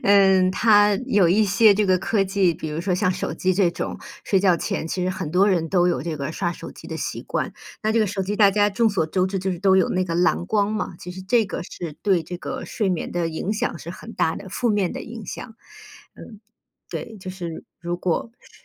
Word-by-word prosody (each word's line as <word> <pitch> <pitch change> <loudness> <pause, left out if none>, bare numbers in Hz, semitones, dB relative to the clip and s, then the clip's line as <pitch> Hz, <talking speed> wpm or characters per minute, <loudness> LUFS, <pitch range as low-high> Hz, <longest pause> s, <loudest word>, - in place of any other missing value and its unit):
嗯， 190 -2 +5
它 205 0 +4
有 200 -8 +4
一 210 +4 +4
些 205 +2 +5
这 205 0 +1
个 185 -1 +4
科 195 +1 +1
技， 190 -2 +2
比 160 - -6
如 155 +2 -3
说 185 +1 -1
像 185 +1 +1
手 180 - -3
机 185 +3 0
这 185 -2 +3
种， - - -4 0.3
睡 195 -2 +2
觉 185 -3 +4
前， 160 - -3
其 185 - -2
实 185 - 0
很 170 -4 -4
多 190 +4 +4
人 170 -4 +1
都 175 -1 +3
有 175 - 0
这 165 -2 -3
个 140 +1 -4
刷 175 - -1
手 - - -9
机 - - -12
的 - - -4
习 - - -4
惯。 - - -3 0.3
那 215 - +2
这 230 - +3
个 215 - +3
手 195 -1 -2
机 200 +2 -2
大 205 -1 +5
家 205 +1 +3
众 225 +3 +2
所 165 -5 0
周 185 +3 +1
知 195 +1 -2
就 190 0 -1
是 175 - -5
都 190 -1 +4
有 185 - +3
那 185 0 0
个 170 -2 -2
蓝 175 0 +2
光 210 +1 +1
嘛， 215 -4 -3
其 180 - -8
实 185 +1 -8
这 225 +3 +2
个 - - -4
是 170 -2 -7
对 185 -6 +2
这 180 - -6
个 255 +8 -5
睡 210 -4 -1
眠 180 -3 -2
的 175 -1 0
影 165 +5 -3
响 210 -5 -2
是 165 - -10
很 225 +5 -10
大 160 - +1
的。 190 - -8
负 240 +6 -1
面 205 -4 +1
的 - - -6
影 225 -2 -8
响， 225 -3 -7 0.6
嗯， 215 -3 -12 0.5
对， 225 -2 -6
就 185 - -6
是 175 -3 -7 0.2
如 175 0 -3
果 180 +5 -1
是 - - -20
190 Hz, 270 characters per minute, -23 LUFS, 175-205 Hz, 0.6 s, 嗯